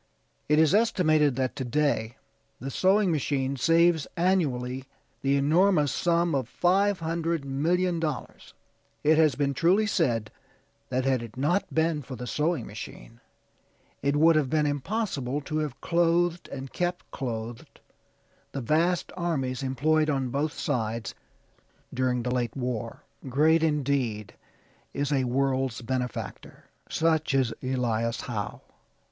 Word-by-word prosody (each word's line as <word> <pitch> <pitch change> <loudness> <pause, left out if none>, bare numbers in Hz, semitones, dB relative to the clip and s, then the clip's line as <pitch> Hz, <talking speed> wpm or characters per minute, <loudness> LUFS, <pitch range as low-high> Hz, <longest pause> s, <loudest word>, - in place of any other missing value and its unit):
It 150 - +4
is 155 -1 +4
estimated 155 - +3
that 130 -1 -1
to 130 - -2
day 120 -3 0 0.4
the 135 +3 -5
sewing 190 +4 +3
machine 140 -3 0
saves 165 +3 +3
annually 135 -8 0 0.4
the 135 0 +2
enormous 155 +1 +3
sum 170 -1 +1
of 130 -4 -1
$500,000,000. 170 -3 0 0.5
It 155 +1 +4
has 155 -5 +4
been 140 0 0
truly 180 +9 +3
said 120 - 0 0.6
that 130 0 -1
had 130 -3 +2
it 115 +1 -9
not 175 +9 0
been 160 -1 +1
for 130 -1 -8
the 125 - -6
sewing 150 +2 -1
machine - - -10 0.8
it 140 +1 +1
would 160 +2 +5
have 150 -4 +2
been 155 +1 +2
impossible 145 - -2
to 155 +2 -3
have 145 -4 -4
clothed 170 0 +1
and 135 -1 -7
kept 175 0 -3
clothed 115 -2 -6 0.7
the 135 - -3
vast 165 +8 +1
armies 145 -8 -2
employed 150 +4 +1
on 135 -3 0
both 145 +4 -1
sides 115 -4 -2 0.8
during 125 -1 0
the 125 +1 -1
late 120 -1 -2
war. 120 -3 -4 0.3
Great, 155 +5 +4
indeed, 140 -9 0 0.6
is 145 0 -1
a 135 -3 +2
world's 130 -1 0
benefactor; 125 0 -4 0.3
such 160 -3 +1
is 130 -4 +2
Elias 120 -3 -1
Howe. 110 -4 -5
145 Hz, 130 wpm, -27 LUFS, 130-165 Hz, 0.8 s, would